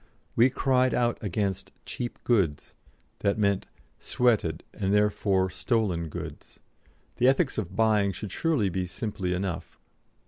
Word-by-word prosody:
We 120 +3 +6
cried 130 -1 +2
out 120 -1 0
against 95 -1 -2
"cheap 120 -1 -5
goods," 95 - +1 0.5
that 100 +1 +1
meant 100 -2 +1 0.3
"sweated 105 -10 +1
and 95 -2 -1
therefore 100 -2 +2
stolen 100 -9 0
goods." - - -8 0.6
"The 125 - +4
ethics 135 0 +2
of 95 -5 -5
buying 105 -3 +3
should 100 0 -6
surely 145 - +1
be 90 0 -2
simply 100 -1 -3
enough. 90 -2 -4
105 Hz, 130 wpm, -27 LUFS, 95-120 Hz, 0.6 s, We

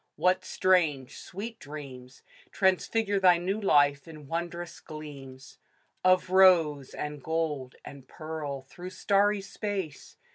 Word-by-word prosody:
What 185 +1 +2
strange, 170 -9 +1
sweet 220 +5 -7
dreams 135 -4 -10 0.3
Transfigure 200 +2 +1
thy 180 -2 +6
new 190 +5 -2
life, 145 -5 +3
in 155 -2 -11
wondrous 170 +3 -5
gleams 140 -3 -11 0.4
Of 185 0 +3
rose, 165 -7 +4
and 150 -1 -5
gold, 150 -4 -2
and 135 -2 -11
pearl, 150 -4 -6
through 175 +7 -9
starry 200 +1 +2
space 195 - -5
165 Hz, 115 wpm, -28 LUFS, 145-185 Hz, 0.4 s, thy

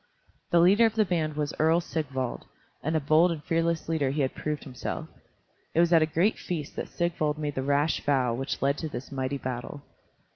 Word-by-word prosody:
The 170 - +4
leader 200 +7 +6
of 225 - -4
the 215 -1 +3
band 160 -4 -1
was 150 -1 -2
Earl 160 +2 +4
Sigvald, 135 -7 -3 0.4
and 160 +2 -1
a - - +3
bold 155 +4 +4
and 155 -3 -5
fearless 165 -1 0
leader 160 -4 +1
he 145 +2 -1
had 130 - 0
proved 150 -1 -3
himself. 130 -3 -5 0.7
It - - +3
was 170 0 +4
at 165 - +7
a 155 - +3
great 175 +7 +1
feast 160 -5 -4
that - - -4
Sigvald 155 -3 -1
made 150 -1 -3
the 135 - -2
rash 145 +3 +1
vow 130 -4 +2
which 135 +3 -3
led 140 +1 +2
to 160 - -3
this 125 -1 -7
mighty 135 0 -2
battle. 130 +2 -5
155 Hz, 210 wpm, -27 LUFS, 140-165 Hz, 0.7 s, at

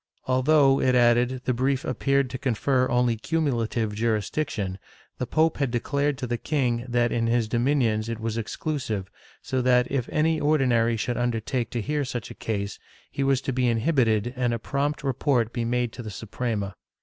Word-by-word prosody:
Although, 135 +1 +4
it 130 -1 +3
added, 120 +1 +3
the 130 - +1
brief 130 +2 0
appeared 140 -2 +1
to 130 - -5
confer 130 +1 +1
only 125 -1 +2
cumulative 115 -6 -1
jurisdiction, 105 -2 -1 0.4
the 125 - -2
pope 160 +4 +2
had 140 -3 0
declared 140 +4 0
to 125 - -4
the 120 -1 -2
king 125 -5 0
that 120 -1 +2
in 115 -1 0
his 115 -1 +1
dominions 120 -2 +1
it 115 -1 -4
was 115 -1 -3
exclusive 115 -4 -3 0.3
so 130 -1 -1
that, 125 0 +3
if 130 -3 -1
any 160 +1 +2
Ordinary 125 -6 +2
should 120 +2 -2
undertake 120 0 -1
to 120 - -3
hear 150 +5 -1
such 120 -4 -5
a - - -7
case, 100 -2 -4 0.3
he 140 - -2
was 135 -1 +2
to 135 - -3
be 125 0 +1
inhibited 115 -2 +2
and 125 -2 0
a - - -2
prompt 140 +5 -2
report 130 -3 +1
be 120 -2 -1
made 120 0 0
to - - -7
the 110 - -6
Suprema. 105 0 -3
125 Hz, 180 wpm, -25 LUFS, 115-135 Hz, 0.4 s, Although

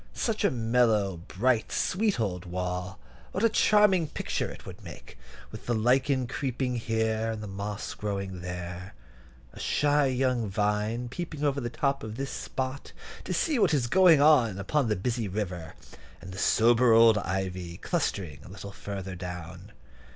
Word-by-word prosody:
Such - - -1
a - - +5
mellow, 115 -5 +2
bright, 115 +3 +1
sweet 205 - 0
old 90 -5 -2
wall; 90 +1 -4 0.4
what 195 - -1
a 230 - +6
charming 210 -6 +4
picture - - -3
it - - -11
would - - -10
make, - - -11 0.4
with - - -10
the 120 - +1
lichen 130 +3 +2
creeping 130 -1 -2
here, 110 -1 0
and 110 -1 -5
the - - -5
moss 100 +1 -5
growing 100 -3 -4
there, 90 -1 -6 0.6
a - - -11
shy 145 -1 +2
young 125 -4 0
vine 105 +4 0
peeping 155 +2 -5
over 140 -1 +1
the 120 - -3
top 140 +2 -1
at 110 0 -6
this 135 +2 -4
spot, 130 +1 -5 0.3
to - - -5
see 305 -6 +1
what 180 -7 +4
is 130 -4 +1
going 175 +3 +6
on 135 -9 +5
upon 130 +7 0
the 105 - +2
busy 115 +3 -2
river, 90 -5 -4 0.4
and 95 - -10
the 95 - -7
sober 120 +1 +4
old 115 -1 +6
ivy 90 -2 -3
clustering 85 -7 -2
a - - -12
little 100 +1 -8
farther 95 -1 -6
down! 90 -2 -8
110 Hz, 165 wpm, -28 LUFS, 95-135 Hz, 0.6 s, a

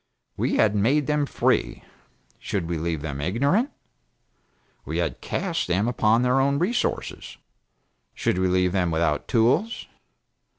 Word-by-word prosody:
We - - 0
had 105 -2 +3
made 135 +9 +2
them 150 0 0
free. - - 0 0.6
Should 90 -5 -3
we 85 -2 -2
leave 80 -2 -3
them 70 -3 -4
ignorant? 140 - +1 1.1
We - - -4
had - - -2
cast 175 -4 -2
them 95 +5 +1
upon 115 -1 +2
their 125 +1 +3
own 140 +1 +2
resources. 190 +10 -2 0.8
Should 90 - 0
we 95 - +2
leave 90 0 +2
them 90 -2 +1
without 80 -2 0
tools? 125 - +1
110 Hz, 135 wpm, -24 LUFS, 90-140 Hz, 1.1 s, had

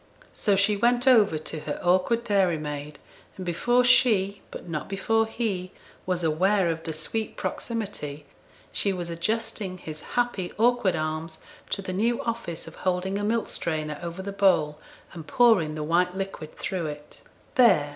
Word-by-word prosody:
So 205 -3 +2
she 200 +2 +4
went 245 +4 +2
over 215 -10 +6
to 155 +1 -5
her 150 -1 -4
awkward 185 +6 +2
dairymaid, 155 -8 0 0.4
and 185 - -6
before 240 +9 +2
she 215 -6 +4
but - - -9
not 155 -3 -4
before 225 +3 +1
he 200 -6 -3 0.3
was 180 -2 0
aware 180 +3 +2
of 165 0 -4
the 160 - -4
sweet 215 +7 -3
proximity, 195 -11 -4 0.5
she 200 - 0
was 175 -2 -4
adjusting 205 +2 -2
his 155 -3 -7 0.2
happy 240 -7 0
awkward 240 -3 +3
arms 155 +1 -3 0.3
to 195 - -2
the 185 - -4
new 230 +5 +1
office 230 -8 -4
of 165 - -11
holding 185 +2 -1
a - - -3
milk 225 +2 0
strainer 155 -2 -2
over 170 +2 -5
the 200 - -4
bowl, 180 -7 +2 0.3
and 165 -3 -9
pouring 200 -11 +4
the 155 - -3
white 180 +4 +1
liquid 190 -5 -6
through 180 -4 -2
it. 150 0 -9 0.3
'There!' 200 - +5
185 Hz, 160 wpm, -26 LUFS, 160-220 Hz, 0.5 s, over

